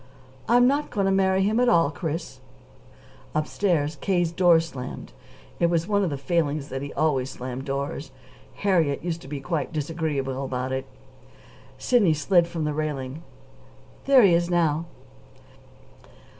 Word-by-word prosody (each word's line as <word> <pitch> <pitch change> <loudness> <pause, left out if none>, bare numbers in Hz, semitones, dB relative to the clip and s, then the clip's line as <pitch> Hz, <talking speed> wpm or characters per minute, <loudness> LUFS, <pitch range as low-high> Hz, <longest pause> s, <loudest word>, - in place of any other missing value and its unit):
"I'm 245 +1 +6
not 285 +3 +1
going 200 -2 -1
to 195 - +2
marry 190 0 +2
him 215 +4 +1
at 250 0 +4
all, 165 -4 +4
Chris." 160 +1 -5 1.0
Upstairs, 155 -1 0
K.'s 175 -4 +1
door 175 -1 +5
slammed. 135 -6 -7 0.5
It 170 - +3
was 170 0 0
one 205 -1 +2
of 185 - 0
his 140 -2 -4
failings 150 -2 -1
that 135 0 -4
he 140 - -6
always 135 -5 0
slammed 130 0 -6
doors. 140 +2 -4 0.5
Harriet 165 -5 +1
used 170 -1 -3
to - - -12
be 145 0 -5
quite 160 +2 -3
disagreeable 145 -4 -2
about 130 -1 -3
it. 130 0 -3 0.9
Sidney 205 -11 +3
slid 170 +3 +3
from 170 -2 -4
the 150 0 -1
railing. 145 -1 -4 0.8
"There 270 -3 +6
he 190 -4 +6
is 170 +1 +2
now." 165 -2 +1
160 Hz, 150 wpm, -25 LUFS, 140-180 Hz, 1.0 s, I'm